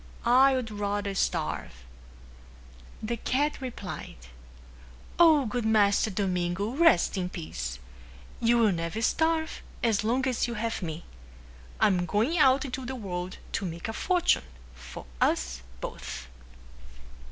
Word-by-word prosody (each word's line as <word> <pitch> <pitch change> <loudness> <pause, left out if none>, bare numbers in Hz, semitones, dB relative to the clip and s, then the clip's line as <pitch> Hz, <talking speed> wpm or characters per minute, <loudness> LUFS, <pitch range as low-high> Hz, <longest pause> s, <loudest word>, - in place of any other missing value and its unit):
I 260 +3 +6
would 245 -4 -3
rather 205 -1 -2
starve." 60 - -2 1.2
The 235 +2 -2
cat 285 +5 0
replied, 235 -7 -6 1.0
"O 315 -5 +6
good 240 +2 -2
master 215 -1 +3
Domingo, 185 0 -1
rest 270 - +4
in 180 -1 -2
peace. 65 - -5 0.6
You 235 +1 +3
will 225 -3 +4
never 170 +5 -3
starve 320 +4 +1 0.2
as 220 -3 +2
long 250 +4 +1
as 250 -2 0
you 235 - -4
have 230 +1 -2
me. 160 -1 -5 0.8
I - - +5
am 180 -3 +2
going 235 - +1
out 270 0 +5
into 260 0 -4
the 260 +1 -4
world 185 -5 -5
to - - -2
make 170 -2 -4
a 220 - -4
fortune 355 - +2 0.3
for 65 0 -10 0.2
us 65 -1 +1 0.2
both." 65 -1 -6
215 Hz, 130 wpm, -28 LUFS, 180-255 Hz, 1.2 s, I